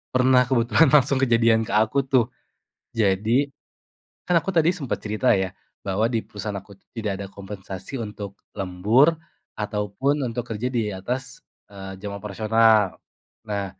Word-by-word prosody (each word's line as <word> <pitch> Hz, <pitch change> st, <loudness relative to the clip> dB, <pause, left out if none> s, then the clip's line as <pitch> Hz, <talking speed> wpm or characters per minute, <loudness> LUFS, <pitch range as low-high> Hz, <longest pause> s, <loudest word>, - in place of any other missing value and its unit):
Pernah, 125 Hz, 0 st, +5 dB
kebetulan 125 Hz, +4 st, +3 dB
langsung 140 Hz, -1 st, +5 dB
kejadian 115 Hz, -2 st, +4 dB
ke -, -, -6 dB
aku 110 Hz, +6 st, +2 dB
tuh. 130 Hz, -4 st, +2 dB, 0.7 s
Jadi, 110 Hz, +5 st, +2 dB, 0.8 s
kan 175 Hz, -2 st, +3 dB
aku 195 Hz, -, -4 dB
tadi 170 Hz, -1 st, +3 dB
sempat 145 Hz, -9 st, -3 dB
cerita 110 Hz, +4 st, 0 dB
ya, 95 Hz, -1 st, -2 dB, 0.3 s
bahwa 105 Hz, +4 st, +1 dB
di 115 Hz, -3 st, -2 dB
perusahaan 105 Hz, 0 st, -5 dB
aku 100 Hz, +1 st, -11 dB
tuh 100 Hz, -, -25 dB
tidak 105 Hz, -3 st, -1 dB
ada 100 Hz, -, -5 dB
kompensasi 100 Hz, +4 st, -7 dB
untuk 105 Hz, -2 st, -7 dB, 0.2 s
lembur 105 Hz, -, +3 dB, 0.4 s
ataupun 105 Hz, +7 st, -1 dB
untuk 120 Hz, 0 st, -2 dB
kerja 120 Hz, +4 st, -3 dB
di 115 Hz, -3 st, 0 dB
atas, 120 Hz, +7 st, -5 dB, 0.2 s
eee, 95 Hz, -1 st, -8 dB
jam 100 Hz, -1 st, -5 dB
operasional. 110 Hz, 0 st, +3 dB, 0.5 s
Nah, 100 Hz, -2 st, -2 dB
110 Hz, 145 wpm, -24 LUFS, 100-130 Hz, 0.8 s, Pernah